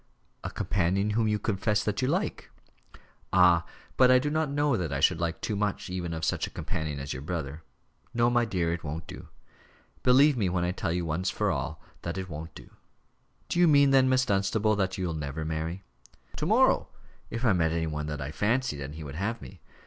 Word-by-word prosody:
"A - - -3
companion 95 +2 0
whom 110 +1 +1
you 105 0 +1
confess 105 0 0
that 105 +2 -1
you 130 - +1
like." - - -2 0.8
"Ah! 90 -2 +5 0.3
but 130 -1 +6
I 130 - +7
don't 150 +2 0
know 145 -2 +2
that 85 -7 -2
I 70 - -1
should 80 +4 +3
like 85 -1 -2
too 105 - -2
much 100 -2 -2
even 90 -2 -3
of 80 0 -3
such - - 0
a - - -8
companion 75 -3 -4
as 70 0 -4
your 65 - -6
brother. 75 -1 -4 0.5
No, 120 0 +2
my 120 0 +3
dear 90 -7 0
it 85 - -5
won't 80 +2 -5
do. - - -10 0.7
Believe 135 +3 +5
me 100 -5 +1
when 90 -1 0
I 90 - 0
tell 90 - -2
you, 90 0 -1
once 85 +4 -1
for - - 0
all, - - -4 0.2
that 85 +2 -4
it 95 0 -5
won't 80 +1 -7
do." - - -12 0.8
"Do 170 - -1
you 175 - +6
mean, 140 -2 +5
then, 130 -1 +5
Miss 130 0 +3
Dunstable, 105 +2 +1
that 95 -2 -1
you'll 90 -3 -2
never 75 0 -4
marry?" 80 +4 -3 0.5
"To - - -1
morrow - - +4 0.4
if 115 +2 -3
I 110 - +5
met 80 -3 +2
any 80 0 0
one 75 -1 -3
that 75 -2 -4
I 70 +2 -4
fancied, 105 - 0
and 70 +2 -6
he 80 - -7
would 70 -2 -7
have 110 +5 -2
me. 95 - -12
95 Hz, 215 wpm, -28 LUFS, 80-115 Hz, 0.8 s, I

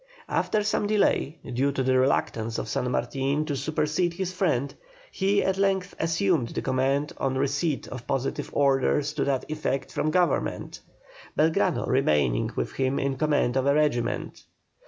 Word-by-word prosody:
After 215 -1 +1
some 210 0 0
delay, 200 -7 +1 0.2
due 135 +3 +1
to 130 - -1
the 130 0 +2
reluctance 115 -4 0
of - - -3
San 125 +3 -1
Martin 135 +4 -1
to 145 - -2
supersede 155 +4 0
his 185 0 -3
friend, 155 -8 0 0.4
he 200 +1 +1
at 190 0 0
length 195 -1 +1
assumed 165 -5 +1
the - - -3
command 135 +2 0
on 135 -1 0
receipt 140 +2 -1
of 125 -2 -8
positive 135 0 -2
orders 140 +1 +2
to 150 - -1
that 135 -2 0
effect 150 -3 -2
from 155 - 0
Government, 175 -2 0 0.6
Belgrano 165 +3 +2
remaining 75 - +2
with - - -2
him 135 0 0
in 135 -1 0
command 145 -3 +1
of 135 0 +1
a 140 - +4
regiment. 150 -6 0
140 Hz, 155 wpm, -26 LUFS, 130-165 Hz, 0.6 s, a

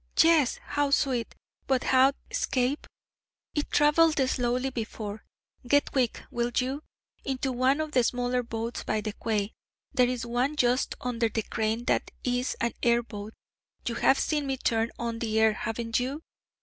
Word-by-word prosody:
'Yes! 320 -5 +5
how 290 -1 0
sweet! 260 -4 +1 0.3
But 260 -2 +2
how 265 +1 +5 0.2
escape?' 275 - 0 0.7
'It 295 - -1
travelled 305 +2 +4
slowly 250 +1 0
before. 220 -3 -5 0.4
Get 285 +3 +3
quick 250 -4 0
will 240 0 0
you? 265 +3 0 0.4
into 265 0 -1
one 255 +3 +2
of 310 -1 -2
the 255 -4 +3
smaller 245 +1 0
boats 230 0 -4
by 215 - -1
the 215 0 -4
quay 210 -1 -2 0.4
there 250 -2 +4
is 250 -1 -2
one 245 +5 0
just 250 -2 +2
under 240 -2 0
the 220 0 -2
crane 220 +3 -1
that - - +1
is 250 0 -1
an 235 0 0
air 235 0 +3
boat 210 -1 -8 0.5
you 235 - -1
have 265 +3 +4
seen 295 -3 0
me 270 -1 -1
turn 230 -2 +1
on 230 -1 -3
the 220 -1 0
air, 220 -1 +5
haven't 230 +2 -2
you? 275 +6 -3
245 Hz, 160 wpm, -28 LUFS, 230-270 Hz, 0.7 s, Yes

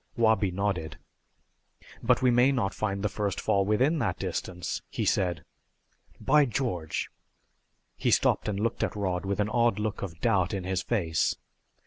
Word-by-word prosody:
Wabi 110 -3 +3
nodded. 90 -6 -2 1.0
"But 125 +2 +2
we 125 - +5
may 125 +3 +5
not 115 -8 0
find 100 -2 -2
the - - +3
first 105 -2 -2
fall 100 -3 +1
within 130 +10 +2
that - - -1
distance," 90 -1 -4
he - - -2
said. 90 -5 0 0.8
"By 150 -1 +4
George 100 - -2 0.4
" - - -47
He - - 0
stopped - - +2
and 100 -1 -2
looked 115 +2 -1
at - - -2
Rod 95 -2 -2
with 100 +1 -1
an 105 0 +1
odd 120 +1 +2
look 105 -1 -3
of 85 -4 -6
doubt 100 -3 +1
in 95 - -3
his 95 0 -1
face. 85 -9 0
100 Hz, 165 wpm, -28 LUFS, 95-115 Hz, 1.0 s, we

